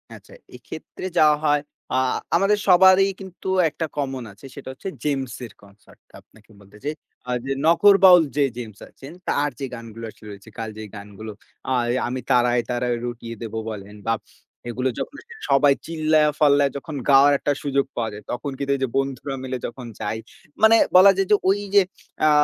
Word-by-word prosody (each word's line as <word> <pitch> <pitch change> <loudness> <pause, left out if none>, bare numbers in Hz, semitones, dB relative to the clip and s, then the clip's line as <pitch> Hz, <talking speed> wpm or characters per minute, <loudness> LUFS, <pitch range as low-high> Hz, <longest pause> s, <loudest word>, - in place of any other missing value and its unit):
আচ্ছা। - - -16 0.2
এক্ষেত্রে - - -9
যা - - +6 0.2
হয়, 145 -1 +2 0.3
আ - - +1 0.4
আমাদের 195 +4 +3
সবারই 190 +1 +6
কিন্তু 190 -1 -10 0.2
একটা 165 +2 -4
কমন 135 -3 -3
আছে, 105 +7 -16
সেটা 140 -2 -9
হচ্ছে 190 +8 -7
জেমস 135 -4 -2
এর 110 - -13
কনসার্ট 100 +1 -20
টা, - - -31
আপনাকে 110 +1 -24
বলতে 100 +1 -17
চাই। 150 +2 -2 0.3
আ - - -8 0.2
যে 135 - -3 0.2
নগর 195 +4 +6
বাউল 180 -3 +9
যে 145 - +4
জেমস 110 -4 -8
আছেন, 135 +2 -12 0.2
তার 145 +1 +1
যে 135 - -3
গানগুলো 115 -1 -8
আসলে 105 - -16
রয়েছে, 100 +2 -12
কালজয়ী 110 -1 -6
গানগুলো। 105 +2 -9 0.4
আয়ে 120 -1 +1
"আমি 130 +1 -3
তারায়, 120 -1 +3
তারায় 120 0 -1
রটিয়ে 115 -1 -6
দেব" 115 -1 -6 0.2
বলেন 105 -1 -8
বা 115 - +3 0.6
এগুলো 125 +2 -1
যখন 285 - -5 0.3
সবাই 140 0 +5
চিল্লায়া-ফাল্লায় 150 -3 +2
যখন 150 +2 -8
গাওয়ার 140 +1 +7
একটা 145 - 0
সুযোগ 140 -1 +1
পাওয়া 115 -2 -2
যায়, 105 - -10
তখন 130 +3 -4
কিন্তু 140 0 -2
এই 135 - -6
যে 130 - +1
বন্ধুরা 135 0 -2
মিলে 130 0 -3
যখন 125 +1 -9
যাই, 105 +2 -3 0.5
মানে 220 +1 +8 0.2
বলা 195 +2 +9
যায় 195 -1 +1
যে - - +8
ঐ - - +5 0.3
যে 200 - +8 0.5
আ - - +6
135 Hz, 180 wpm, -22 LUFS, 115-150 Hz, 0.6 s, বাউল